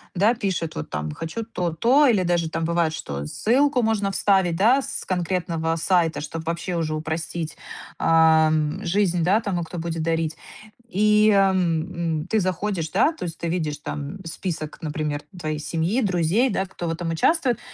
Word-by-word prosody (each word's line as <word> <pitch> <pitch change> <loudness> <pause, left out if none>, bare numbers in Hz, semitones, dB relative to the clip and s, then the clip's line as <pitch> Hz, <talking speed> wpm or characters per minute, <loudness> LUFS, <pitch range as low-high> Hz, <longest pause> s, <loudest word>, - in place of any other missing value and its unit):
да, 210 +6 +4
пишет, 190 -7 -2
вот 75 - -5
там 75 0 -3
"хочу 165 - -5
то, 180 -6 -2
то" 260 - +4
или 210 -7 +3
даже 170 -2 +1
там, 165 - -3
бывает, 170 -1 +1
что 70 - -5
ссылку 250 - +2
можно 210 -3 +1
вставить, 190 -4 +2
да, 240 +9 +4
с 270 0 -5
конкретного 170 -3 -1
сайта, 165 -1 +1
чтоб 160 +2 -6
вообще 170 +2 -3
уже 155 -2 -1
упростить, 160 0 -4 0.4
ам, 160 -1 +3
жизнь, 180 -2 +1
да, 200 +5 +3
тому, 190 -6 -2
кто 170 +2 -8
будет 165 -1 -3
дарить. 165 -1 -1 0.5
И, 210 0 +4
эм, 170 -4 +1
м, 170 - -8
ты 220 +1 +1
заходишь, 185 -2 -1
да, 230 - +3
то 320 - -8
есть 165 -2 -6
ты 170 - -2
видишь 155 -4 -2
там 145 +4 -5
список, 160 -2 -5
например, 150 -1 -3 0.2
твоей 155 -2 -3
семьи, 170 - -1
друзей, 195 +5 +2
да, 190 - -1
кто 175 -2 -6
в - - 0
этом 165 0 -3
участвует, 250 - +2
170 Hz, 175 wpm, -23 LUFS, 160-200 Hz, 0.5 s, да